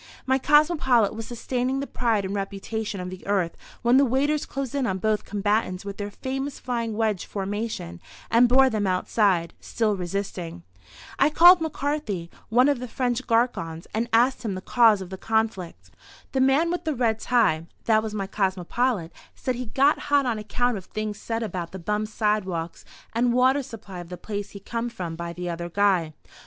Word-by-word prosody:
My 265 0 +2
cosmopolite 290 - +4
was 225 0 -6
sustaining 250 +2 -2
the 280 - -2
pride 225 -6 0
and 190 - -3
reputation 200 +1 -4
of 180 0 -5
the 185 - -9
Earth 190 -4 0 0.3
when 240 +2 +5
the 275 - +6
waiters 280 +4 +1
closed 270 -3 -4
in 275 -3 0
on 190 - -1
both 215 +2 0
combatants 205 -2 -1
with 200 0 -6
their 205 0 -4
famous 270 +6 -4
flying 230 -3 -3
wedge 215 -5 0
formation 200 - -4 0.3
and 235 +1 +5
bore 265 +2 +6
them 215 -5 0
outside, 185 -2 +1
still 220 -3 0
resisting. 180 - -4 0.6
I - - +5
called 345 +3 +7
McCarthy, 285 - -2 0.2
one 245 +4 +5
of 285 -3 +2
the 250 - -5
French 245 +1 -2
garçons, 225 -9 0
and 230 +2 -1
asked 245 +4 +3
him 210 -4 -2
the 185 - -5
cause 225 -2 +4
of 185 -1 -8
the 190 - -6
conflict. 190 - -2 0.4
"The 265 - +1
man 275 +6 +3
with 350 - -2
the 310 -2 -1
red 230 -3 +1
tie" 165 -10 +2 0.2
(that 220 -1 +4
was 215 -1 -5
my 195 -2 -2
cosmopolite), 190 0 -1 0.2
said 255 - -2
he, 250 0 -5
"got 275 +7 +3
hot 285 -1 +4
on 230 -3 -1
account 245 +2 0
of 190 - -9
things 215 -1 -4
said 225 +1 -3
about 180 -5 -4
the - - -5
bum 210 +4 -2
sidewalks 205 -6 -1 0.3
and 235 +1 +2
water 260 +3 +4
supply 225 -8 -9
of 175 -1 -9
the 180 - -6
place 205 +2 -5
he 200 - -10
come 230 +4 -3
from 175 -7 -5
by 170 0 -5
the 180 +1 -6
other 170 0 -4
guy." 185 -4 +2
220 Hz, 190 wpm, -25 LUFS, 190-250 Hz, 0.6 s, called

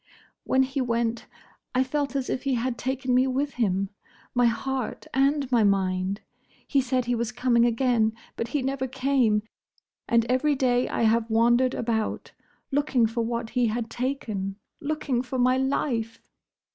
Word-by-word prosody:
"When 265 0 +3
he 270 +1 -2
went, 235 -1 -1 0.5
I 255 - +4
felt 280 +1 -2
as 270 -2 -1
if 255 - -2
he 275 -2 0
had 245 +1 -1
taken 260 +1 -2
me 255 +1 +4
with 275 +2 -1
him: 195 -2 +1 0.4
my 245 -1 +4
heart 255 +1 -2
and 275 +2 +2
my 235 -3 +4
mind. 190 -1 +1 0.5
He 275 - +3
said 255 -1 0
he 245 - 0
was 235 -1 -1
coming 240 -1 +3
again—but 230 -2 0
he 265 +3 -1
never 265 0 -1
came; 255 -5 +1 0.7
and 230 -1 +4
every 260 +4 +2
day 250 -2 +1
I - - -1
have 225 +1 +2
wandered 240 +3 +3
about; 225 -2 -2 0.4
looking 275 -4 +2
for 230 +1 -1
what 235 0 -3
he 245 -2 +2
had 225 +1 -3
taken; 220 -7 -3 0.2
looking 290 -5 -1
for 260 +1 -5
my 255 +1 +3
life!" 260 -4 -1
245 Hz, 160 wpm, -26 LUFS, 230-265 Hz, 0.7 s, I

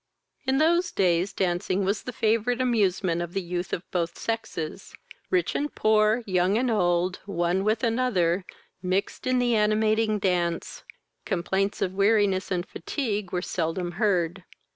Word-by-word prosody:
In 265 0 +2
those 340 +4 +3
days 180 0 +2
dancing 185 +1 0
was 200 +2 0
the 250 - -6
favourite 230 +2 +1
amusement 195 -8 +1
of 175 0 -5
the 195 - +1
youth 175 +1 -4
of 175 - -2
both 170 -2 -2
sexes: 225 -8 -4 0.3
rich 365 -2 +1
and 295 +1 -2
poor, 215 +2 +3
young 185 +1 +2
and 250 0 +1
old, 180 -3 +1
one 175 0 0
with 215 +3 0
another, 215 -7 +1 0.4
mixed 185 +7 -2
in 255 0 +2
the 245 -1 +2
animating 215 0 +2
dance: 175 -4 -1 0.4
complaints 195 +1 -1
of 185 - -2
weariness 200 -1 +2
and 180 -1 -2
fatigue 210 - -3
were 180 0 -2
seldom 175 0 -2
heard. 185 -3 +1
195 Hz, 145 wpm, -26 LUFS, 180-225 Hz, 0.4 s, those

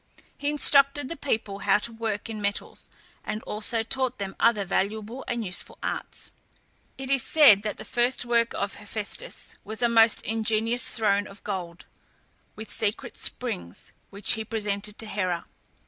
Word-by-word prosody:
He 285 - -2
instructed 280 -1 +4
the 335 - -4
people 220 -8 -2
how 200 0 +3
to 220 +3 -4
work 225 -2 -3
in 220 -2 -6
metals, 200 0 -3 0.3
and 215 - -4
also 225 +2 0
taught 260 +2 -1
them 195 -1 -5
other 220 -4 +3
valuable 215 +6 -2
and 235 -2 -2
useful 180 - -1
arts. - - -3 0.7
It 270 0 -5
is 270 -2 +4
said 265 -11 +6
that 210 -1 -4
the - - -8
first 245 +1 +1
work 235 -1 +2
of - - -3
Hephæstus - - -6
was 220 +2 -4
a - - +6
most 225 -1 +5
ingenious 225 +3 +1
throne 205 -2 +2
of 200 - -13
gold, 180 -4 -5 0.7
with 220 +1 -8
secret 215 -1 -2
springs, 85 +1 -3 0.2
which 200 0 +2
he 220 - +1
presented 210 -1 -3
to 225 - -4
Hera. 185 -5 -2
220 Hz, 160 wpm, -26 LUFS, 205-240 Hz, 0.7 s, said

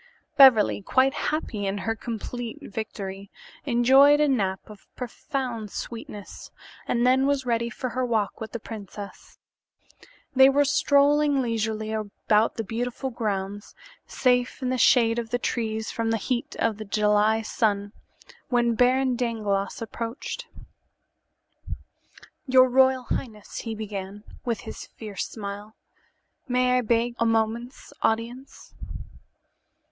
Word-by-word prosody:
Beverly, 255 -7 +6
quite 260 +6 +2
happy 220 -10 -2
in 195 +1 -2
her 225 +3 -2
complete 235 +1 -5
victory, 200 -2 -6 0.4
enjoyed 270 +4 +6
a 300 - +4
nap 195 -8 0
of 210 -2 -14
profound 250 -3 -4
sweetness 210 -2 -8 0.4
and 240 0 +1
then 260 +2 +4
was 280 -2 0
ready 235 -1 0
for 255 +1 -4
her 255 +2 -2
walk 225 -4 -1
with 220 -1 -6
the 235 - -5
princess. 205 -2 -9 1.0
They 265 +1 +8
were 285 +1 +3
strolling 285 0 +3
leisurely 220 -3 -2
about 215 0 0
the 225 - -3
beautiful 245 +5 -3
grounds, 205 -3 -4 0.3
safe 250 0 +1
in 255 - 0
the 255 - 0
shade 235 -2 +4
of 230 -1 -5
the 245 - 0
trees 220 -2 -2
from 225 -1 -2
the 225 - +1
heat 245 +2 -3
of 225 -2 0
the 215 - -7
July 210 +2 +2
sun, 205 -2 0 0.6
when 240 -1 +2
Baron 255 +2 +3
Dangloss 215 -4 -2
approached. 230 - -6 2.0
"Your 255 0 +6
royal 260 0 +4
highness," 220 -3 -5
he 225 -1 -5
began, 205 -1 -6 0.2
with 235 -3 -1
his - - -8
fierce 210 -3 -6
smile, 205 0 -7 0.7
"may 250 0 +2
I - - +1
beg 235 +1 +1
a 230 - +2
moment's 225 +3 -1
audience?" 235 +4 -3
230 Hz, 130 wpm, -25 LUFS, 215-255 Hz, 2.0 s, They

